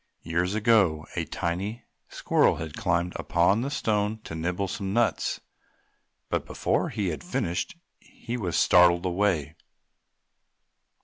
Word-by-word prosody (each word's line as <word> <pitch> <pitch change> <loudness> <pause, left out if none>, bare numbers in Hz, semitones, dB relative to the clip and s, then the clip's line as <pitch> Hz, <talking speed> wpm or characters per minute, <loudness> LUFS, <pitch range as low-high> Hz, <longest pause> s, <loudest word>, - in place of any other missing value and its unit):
Years 85 +4 -1
ago 105 -9 +3
a - - -1
tiny 95 +7 -3 0.3
squirrel - - +2
had 80 -2 -6
climbed 85 0 0
upon 90 +6 +2
the 135 - -2
stone 110 -6 0
to - - -8
nibble 90 +4 -2
some 95 0 -4
nuts, 115 -5 0 0.9
but - - -1
before - - -1
he 100 -3 -2
had 75 -5 -5
finished 85 - -2 0.2
he 120 0 -8
was 90 -9 -2
startled 90 0 +5
away. 90 -4 0
90 Hz, 125 wpm, -26 LUFS, 85-105 Hz, 0.9 s, startled